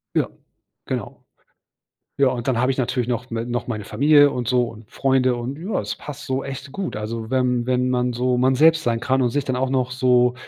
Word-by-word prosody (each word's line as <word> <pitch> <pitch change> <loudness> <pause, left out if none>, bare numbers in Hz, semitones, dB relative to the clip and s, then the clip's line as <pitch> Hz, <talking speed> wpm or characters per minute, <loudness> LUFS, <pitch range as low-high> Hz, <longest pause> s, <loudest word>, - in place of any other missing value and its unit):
Ja, - - +1 0.6
genau. - - -4 1.0
Ja. 140 - +5
Und 125 -1 -2
dann 125 - +1
habe 125 +1 +2
ich 130 - -5
natürlich 125 -2 -1
noch 125 0 -3
me 115 0 -3
noch 120 0 -3
meine 110 -4 -4
Familie 145 +3 +5
und 125 -4 -4
so 125 -1 +3
und 115 -2 -11
Freunde. 130 -2 +2
Und 125 +4 -5
ja, 185 +7 -4
das - - -4
passt 145 -1 -9
so 130 0 -2
echt 135 0 -7
gut. 190 - -4
Also, 110 +1 -5
wenn 125 -2 +1
wenn 125 0 +1
man 125 0 +1
so 125 +1 0
man 130 +1 +3
selbst 160 +3 +5
sein 115 -1 0
kann 130 +1 +1
und 125 - +2
sich 140 +3 -1
dann 130 - -1
auch 130 +1 0
noch 130 -1 0
so 125 -1 +3
125 Hz, 225 wpm, -22 LUFS, 120-135 Hz, 1.0 s, Ja